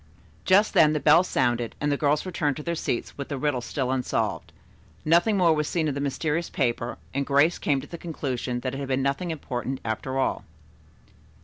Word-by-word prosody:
Just 200 +3 +4
then 155 -1 +5
the 150 - 0
bell 155 +5 +6
sounded 120 -8 0
and 145 0 0
the - - +2
girls 145 +2 +1
returned 155 -6 -1
to 150 - -6
their 170 - -2
seats 145 -4 -3
with 140 - -4
the 140 - -3
riddle 135 -2 0
still 130 +1 -2
unsolved. 110 -8 -1 0.5
Nothing 175 +7 +4
more 170 -3 +4
was 150 -1 -1
seen 160 -3 0
of 145 - -1
the 140 - -3
mysterious 155 +4 -1
paper, 120 -3 -1 0.2
and 140 +1 0
Grace 145 +5 +3
came 140 -3 +1
to - - -10
the 170 +2 -9
conclusion 130 -6 -3
that 130 0 -3
it 135 - -4
had 140 - -4
been 130 0 0
nothing 140 +6 -1
important, 130 -4 -4
after 125 +4 -3
all. 135 - 0
145 Hz, 205 wpm, -26 LUFS, 130-160 Hz, 0.5 s, bell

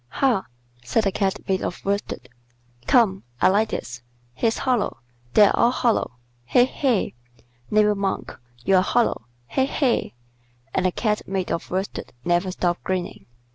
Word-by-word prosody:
"Ha!" 240 - +1 0.4
said 130 - +1
the 195 - +1
Cat 195 0 -1
made 190 -1 +1
of - - -5
worsted. 200 -10 -2 0.6
"Come. 210 -6 +4 0.2
I - - +5
like 210 +3 +2
this. 120 -1 -5 0.3
He's 225 - 0
hollow. 250 - 0 0.4
They're 205 -1 +6
all 235 - +4
hollow. 240 - +1 0.3
He! 135 - +4
he! 255 -5 0 0.6
Neighbor 210 0 +4
Monk, 200 -1 -3 0.3
you're 190 -1 +5
hollow. 190 - +1 0.2
He! 265 0 +1
he!" 265 - 0 0.6
and 185 - +2
the - - 0
Cat 210 +2 -1
made 190 -1 -2
of - - -3
worsted 190 +2 -4
never 175 +2 +2
stopped 175 -1 -1
grinning. 185 -1 -3
195 Hz, 145 wpm, -23 LUFS, 185-225 Hz, 0.6 s, They're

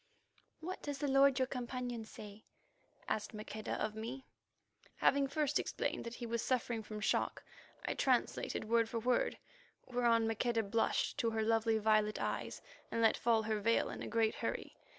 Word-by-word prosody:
"What 365 +4 -5
does 290 -1 -4
the 290 - -1
lord 275 -1 +5
your 260 - +3
companion 245 -2 -4
say?" 210 -1 -11 0.6
asked 215 0 -2
Maqueda 215 0 -5
of 215 0 -1
me. 235 +5 -6 0.7
Having 280 0 +3
first 295 +1 +1
explained - - -2
that 235 0 -5
he 240 - -5
was 235 0 -1
suffering 240 -3 0
from 215 0 -7
shock, - - 0 0.4
I - - 0
translated - - 0
word 230 0 +3
for 235 - -3
word, 245 +2 +1 0.5
whereon 235 -2 +2
Maqueda 225 +1 +1
blushed 225 +6 0
to 235 -4 +2
her 220 -1 0
lovely 225 0 +2
violet 215 0 +2
eyes - - -3 0.3
and - - -2
let 225 -1 +5
fall 230 -2 +2
her 215 -1 0
veil 230 +3 +2
in - - -7
a - - -4
great 225 -1 +2
hurry. - - -4
230 Hz, 170 wpm, -35 LUFS, 220-250 Hz, 0.7 s, lord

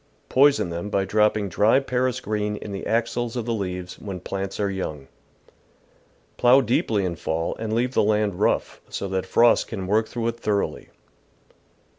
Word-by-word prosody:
Poison 140 -8 +4
them 85 +4 -4
by 100 -1 0
dropping 105 0 +2
dry 105 +8 +3
Paris 130 -1 -1
green 105 -2 -2
in 105 - -7
the 100 - -5
axils 120 +1 -1
of 120 -3 -3
the 120 - -1
leaves 90 -4 -4
when 95 -3 -6
j^lants 95 +2 -5
are 105 - +1
young. 80 -8 -4 1.3
Plough 125 +3 +6
deeply 110 -4 +1
in 85 -2 -2
fall 80 0 -2
and 110 -1 -4
leave 120 +3 0
the - - +3
land 105 -2 +1
rough, - - 0
so 100 - -4
that 95 -1 -2
frost 120 0 +4
can 95 -5 -5
work 110 +3 +1
through 115 -1 -3
it 115 0 -6
thoroughly. 105 -3 -2
105 Hz, 170 wpm, -24 LUFS, 95-115 Hz, 1.3 s, Plough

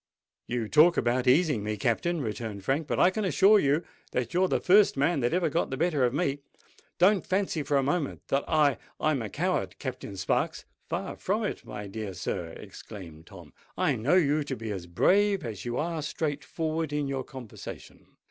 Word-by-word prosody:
"You 120 -2 -2
talk 155 +7 +5
about 120 +1 +1
easing 140 - +3
me, 105 0 -2
Captain," 145 - 0
returned 110 -4 -5
Frank; 140 +7 0
"but - - -1
I 180 - +6
can 215 +3 -2
assure 195 +5 +5
you 145 +1 +2 0.3
that 125 +6 -2
you're 185 +2 +3
the - - +1
first 195 -3 +5
man 145 +3 +2
that 120 -1 +1
ever 180 0 +2
got 170 - 0
the 135 - -3
better 155 -3 +1
of 120 - +1
me. 145 -1 -1 0.6
Don't 195 +3 +4
fancy 190 -4 0
for 140 0 +1
a 135 - +2
moment 145 +1 -1
that 140 +1 +1
I—I'm 150 -1 +1
a 110 - -4
coward, - - -1
Captain 100 - -6
Sparks——" 95 - -1 0.2
"Far - - -3
from - - -1
it, - - -3
my 105 -1 -6
dear 100 -1 -6
sir," 90 -1 -3
exclaimed 85 -7 -11
Tom. - - -13 0.2
"I - - +2
know 130 +11 +2
you 150 -4 +3
to 135 - -3
be 115 -2 -5
as 90 -4 -5
brave 195 - +3
as 110 -4 -6
you 120 0 -2
are 165 0 -2
straight 150 -1 -3
forward 160 -1 -2
in 150 -1 -1
your 135 -1 -2
conversation. 125 -5 -10
140 Hz, 195 wpm, -28 LUFS, 115-170 Hz, 0.6 s, I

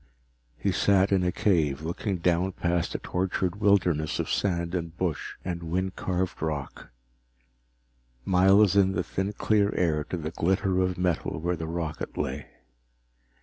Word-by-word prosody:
He - - 0
sat 100 -1 +3
in 95 -2 +3
a 90 - +1
cave, 80 -8 +1
looking 90 +4 -2
down 90 +2 +1
past 85 0 -1
a - - +2
tortured 90 0 -2
wilderness 85 -8 +2
of - - -2
sand 85 -3 0
and 85 -1 -4
bush 90 -5 -2
and 85 -2 -3
wind 90 +3 -2
carved 90 -1 -2
rock, 75 -4 -4 1.4
miles 95 +2 +5
in 95 -1 +4
the 90 0 0
thin 95 +3 -2
clear 105 -1 +2
air 80 -4 +1
to 90 - -4
the 80 -1 -4
glitter 95 +2 +1
of 90 0 0
metal 90 -2 -1
where 85 +2 -1
the 80 -1 -5
rocket 80 -2 -4
lay. 70 +3 -3
90 Hz, 150 wpm, -27 LUFS, 85-95 Hz, 1.4 s, miles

